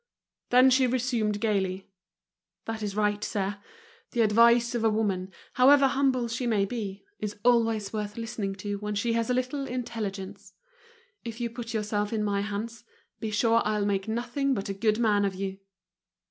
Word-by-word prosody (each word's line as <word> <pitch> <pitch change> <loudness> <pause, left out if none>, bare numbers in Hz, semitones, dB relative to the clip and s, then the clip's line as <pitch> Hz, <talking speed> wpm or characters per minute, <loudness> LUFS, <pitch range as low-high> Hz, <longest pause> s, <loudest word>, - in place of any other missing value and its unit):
Then 255 +1 +6
she 260 0 +4
resumed 235 -4 0
gaily: 195 -3 -1 0.7
"That 225 -1 -4
is 205 -2 -3
right, 210 0 +1
sir. 200 -1 -2 0.5
The 235 - +2
advice 235 +2 +5
of 235 -2 -1
a 225 - +4
woman, 195 -4 -1 0.2
however 275 +2 +6
humble 265 -3 +1
she 235 +2 -3
may 210 -4 +2
be, 200 -3 -5
is 210 -1 -4
always 225 -4 +2
worth 210 0 -4
listening 220 -4 -3
to 200 +1 -4
when 210 0 -3
she 230 +3 0
has 230 0 0
a - - +3
little 260 +2 -2
intelligence. 205 -5 -5 0.7
If 230 0 -7
you 235 -1 -2
put 230 -1 -6
yourself 210 -1 -1
in 220 -2 -1
my 200 -1 0
hands, 215 +3 -5 0.4
be 220 - -3
sure 230 +2 +3
I'll 210 -1 0
make 195 -1 -1
nothing 245 +4 -1
but 200 -2 -4
a - - -1
good 215 +2 +1
man 210 -3 +2
of 195 -1 -1
you!" 195 0 -4
220 Hz, 175 wpm, -27 LUFS, 205-235 Hz, 0.7 s, Then